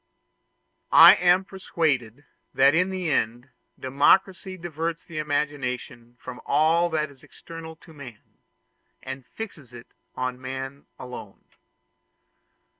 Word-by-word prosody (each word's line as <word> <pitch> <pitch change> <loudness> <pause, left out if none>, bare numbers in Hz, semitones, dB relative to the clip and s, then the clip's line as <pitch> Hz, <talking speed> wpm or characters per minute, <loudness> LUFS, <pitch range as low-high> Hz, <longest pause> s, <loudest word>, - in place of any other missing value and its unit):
I - - +10
am 180 +3 +3
persuaded 145 - -2 0.3
that 140 +1 +5
in 180 +3 +2
the 185 -4 -3
end 120 +1 -1 0.3
democracy 185 +8 +2
diverts 165 -1 -4
the 165 -2 -6
imagination 130 -5 -3
from 125 -1 -9
all 160 +4 +2
that 155 -2 -2
is 135 -2 -19
external 165 -1 -11
to 160 0 -18
man, 130 -7 -13 0.6
and 130 -1 -8
fixes 150 - -8
it 120 - -14 0.2
on 125 0 -4
man 135 +1 -7
alone. 125 -5 -10
145 Hz, 115 wpm, -25 LUFS, 130-165 Hz, 0.6 s, I